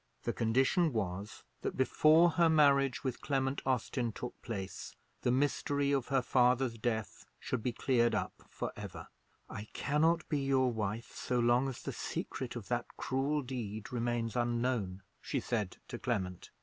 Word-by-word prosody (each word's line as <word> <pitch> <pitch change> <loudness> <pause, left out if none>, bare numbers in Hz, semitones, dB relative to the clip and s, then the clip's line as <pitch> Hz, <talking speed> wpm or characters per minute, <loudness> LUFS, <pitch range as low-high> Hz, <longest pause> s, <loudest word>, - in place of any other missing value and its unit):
The - - -1
condition 135 +8 +2
was, 100 -1 -3 0.2
that, - - -3
before 155 +6 +5
her 170 0 +4
marriage 140 -4 +4
with 130 -3 -3
Clement 135 -1 0
Austin 125 -1 0
took 125 +2 -6
place, 100 -5 -6 0.3
the - - +1
mystery 140 +2 +1
of 135 -4 +1
her 135 -2 +2
father's 125 -1 +3
death 110 -2 -2 0.2
should 130 - -2
be 125 - 0
cleared 120 -1 +2
up - - -1 0.2
for - - -4
ever. - - -8 0.4
"I 105 - -6
cannot 160 +3 +2
be 150 - 0
your 135 -2 +2
wife 110 0 -3
so 125 - -1
long 120 +3 +3
as 130 - -8
the - - -4
secret 125 -2 -4
of 115 -5 -6
that 120 -1 -1
cruel 140 +3 0
deed 110 -4 -5
remains 120 -1 -1
unknown," 120 -5 0 0.2
she 140 - -1
said 110 -5 -2
to - - -5
Clement. 95 -7 -2
125 Hz, 160 wpm, -33 LUFS, 115-135 Hz, 0.4 s, before